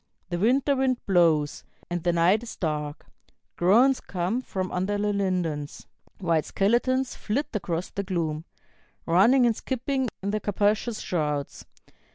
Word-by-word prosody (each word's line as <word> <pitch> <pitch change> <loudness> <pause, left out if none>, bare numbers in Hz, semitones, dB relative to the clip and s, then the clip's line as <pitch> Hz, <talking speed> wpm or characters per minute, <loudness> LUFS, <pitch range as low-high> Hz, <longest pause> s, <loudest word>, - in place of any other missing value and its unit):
The 175 -1 -2
winter 260 +7 +3
wind 260 -1 +1
blows, 165 -6 +2 0.2
and 175 0 -3
the 175 - +1
night 170 +5 +3
is 240 - -8
dark; 150 -3 -3 0.5
Groans 240 +10 +4
come 190 +7 -2
from 185 -6 -4
under 190 +3 -1
the 205 0 0
lindens; 175 -7 -2 0.3
White 165 -5 +1
skeletons 245 +5 +1
flit 255 +8 -2
across 180 -4 -3
the 200 - -3
gloom, 165 -5 -2 0.6
Running 225 +10 +5
and 230 -2 +2
skipping 260 +1 -2
in 200 - -1
their 215 - 0
capacious 210 +3 0
shrouds. 150 -4 -2
195 Hz, 140 wpm, -26 LUFS, 170-235 Hz, 0.6 s, Running